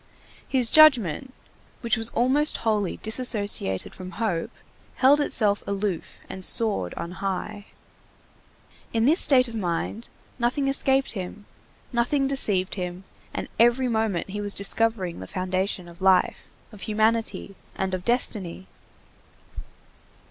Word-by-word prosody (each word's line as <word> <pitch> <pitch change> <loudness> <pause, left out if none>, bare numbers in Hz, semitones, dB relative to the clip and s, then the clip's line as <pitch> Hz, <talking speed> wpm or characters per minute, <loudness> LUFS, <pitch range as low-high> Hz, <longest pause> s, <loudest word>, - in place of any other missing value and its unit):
His 250 -4 +2
judgment, 265 - +5 0.5
which 235 -2 +1
was 225 0 +1
almost 270 +6 +2
wholly 210 -4 0
disassociated 210 - 0
from 185 0 -9
hope, 195 -8 -2 0.5
held 280 +3 +4
itself 210 -7 +1
aloof 200 -3 -3
and 190 - -8
soared 210 - +2
on 170 - -6
high. 195 +2 -5 1.3
In 225 0 +1
this 320 +7 +4
state 255 -3 +5
of 230 - -10
mind 205 +2 -3 0.3
nothing 255 +4 0
escaped 270 0 +2
him, 200 +1 -7 0.5
nothing 245 +4 +1
deceived 205 -9 +1
him, 180 -1 -5 0.3
and - - -5
every 240 +3 +4
moment 220 -6 -1
he 205 +1 -4
was 205 -1 -1
discovering 200 -3 0
the 95 - -8
foundation 185 - -3
of 170 +2 -15
life, 190 -1 +2 0.2
of 210 -3 -14
humanity, 220 -1 -1 0.2
and 190 -1 -3
of 185 -1 -3
destiny. 195 -6 -2
215 Hz, 125 wpm, -24 LUFS, 185-240 Hz, 1.3 s, judgment